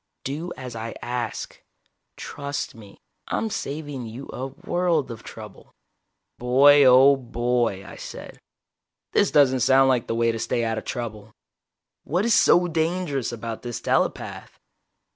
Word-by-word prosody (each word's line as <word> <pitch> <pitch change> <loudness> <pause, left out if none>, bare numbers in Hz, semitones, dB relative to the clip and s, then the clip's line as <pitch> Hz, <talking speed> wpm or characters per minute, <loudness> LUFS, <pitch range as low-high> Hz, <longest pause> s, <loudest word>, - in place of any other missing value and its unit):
Do 155 +6 -4
as 125 -2 -7
I 115 0 -6
ask. 120 0 -4 0.6
Trust 140 0 -5
me. 105 -3 -14 0.3
I'm 220 - -2
saving 145 -6 -5
you 120 +5 -8
a 130 - -4
world 165 -1 -1
of 115 - -8
trouble." - - -12 0.6
"Boy, 140 +4 +6
oh 130 +2 +7
boy!" 120 -5 -1
I - - -11
said. - - -9 0.7
"This - - +3
doesn't 135 -3 +4
sound 135 +2 +5
like 125 -3 +1
the 115 - -2
way 115 0 +2
to 115 - -5
stay 120 +1 -1
out 115 -1 -1
of - - -13
trouble. 110 -3 -6 0.7
What 180 +8 0
is 235 - +3
so 180 -3 +5
dangerous 160 -5 -1
about 115 -1 -6
this 120 -1 -5
telepath?" - - -2
130 Hz, 145 wpm, -24 LUFS, 115-145 Hz, 0.7 s, oh